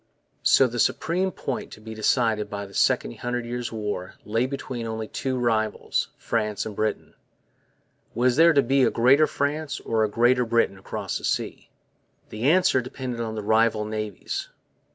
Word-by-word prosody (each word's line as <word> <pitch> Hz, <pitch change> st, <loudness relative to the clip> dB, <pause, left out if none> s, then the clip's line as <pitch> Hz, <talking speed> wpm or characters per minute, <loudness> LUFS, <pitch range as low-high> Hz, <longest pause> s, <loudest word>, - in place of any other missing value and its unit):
So 135 Hz, -, +5 dB
the 120 Hz, -, -3 dB
one -, -, -2 dB
supreme 185 Hz, +10 st, +1 dB
point 135 Hz, -6 st, -5 dB
to -, -, -11 dB
be 110 Hz, +1 st, -8 dB
decided 110 Hz, -1 st, +1 dB
by 100 Hz, -1 st, -5 dB
the 100 Hz, -, -14 dB
Second -, -, +1 dB
Hundred 120 Hz, 0 st, -2 dB
Years' 120 Hz, 0 st, -4 dB
War 105 Hz, -4 st, -4 dB
lay 115 Hz, +4 st, 0 dB
between 130 Hz, -3 st, -5 dB
only 110 Hz, -1 st, -4 dB
two 130 Hz, +3 st, -3 dB
rivals, 110 Hz, -3 st, 0 dB
France 105 Hz, -3 st, -1 dB
and 110 Hz, -2 st, -6 dB
Britain. 110 Hz, +1 st, -2 dB, 1.0 s
Was 125 Hz, +1 st, +3 dB
there 165 Hz, +3 st, +7 dB
to 140 Hz, -3 st, +4 dB
be 135 Hz, +3 st, +2 dB
a -, -, +5 dB
Greater 135 Hz, +6 st, +4 dB
France 145 Hz, +1 st, -2 dB
or 110 Hz, -1 st, 0 dB
a 110 Hz, -, +1 dB
Greater 120 Hz, +3 st, +3 dB
Britain 115 Hz, -4 st, +1 dB
across -, -, -4 dB
the -, -, -16 dB
seas? -, -, -2 dB, 0.6 s
The 115 Hz, +6 st, 0 dB
answer 180 Hz, -6 st, +4 dB
depended 125 Hz, -1 st, -5 dB
on 110 Hz, -1 st, -3 dB
the 105 Hz, -, -4 dB
rival 110 Hz, 0 st, +2 dB
navies. 105 Hz, -2 st, -4 dB
115 Hz, 175 wpm, -25 LUFS, 110-130 Hz, 1.0 s, there